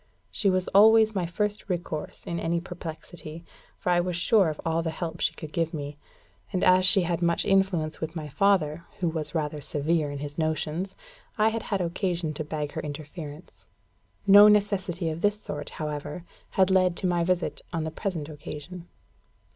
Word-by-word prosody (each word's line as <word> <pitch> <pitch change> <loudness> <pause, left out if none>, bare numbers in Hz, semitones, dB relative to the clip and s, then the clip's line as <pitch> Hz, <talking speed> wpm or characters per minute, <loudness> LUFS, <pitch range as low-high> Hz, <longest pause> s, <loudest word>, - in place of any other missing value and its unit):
She 200 - +1
was 185 -1 +1
always 220 +2 +6
my 185 -4 -1
first 210 +3 -2
resource 170 -4 -4
in 170 -1 -3
any 170 +1 0
perplexity, 170 -2 -8 0.3
for 180 - -1
I 175 - +4
was 180 0 -1
sure 190 0 +4
of 155 - -5
all 165 0 +1
the 165 - -2
help 165 0 -5
she - - 0
could 155 -1 -9
give 165 -1 -1
me. 145 -1 -6 0.5
And 185 -3 -1
as 185 0 +5
she 195 -1 +5
had 175 0 -1
much 170 -1 +2
influence 190 -6 +1
with 160 +1 -4
my 155 -2 -4
father, 170 -2 +2 0.2
who 175 - +1
was 160 +1 -3
rather 150 -1 -2
severe 150 +2 0
in 145 - -5
his 145 +2 -6
notions, 160 +4 -1 0.4
I 215 0 +4
had 225 0 -3
had 195 -3 -2
occasion 175 -2 -1
to 155 - -4
beg 150 -1 -4
her - - -4
interference. 150 +2 -8 0.6
No 205 +1 +9
necessity 195 -4 +2
of 160 +2 -6
this 205 0 +2
sort, 145 -7 -5
however, 150 +1 -4 0.3
had 190 0 +3
led 185 -2 +3
to - - -1
my 175 -1 +2
visit 180 0 0
on 165 -2 -2
the 160 - -3
present 165 -4 -3
occasion. 155 +3 -8
170 Hz, 185 wpm, -27 LUFS, 155-190 Hz, 0.6 s, No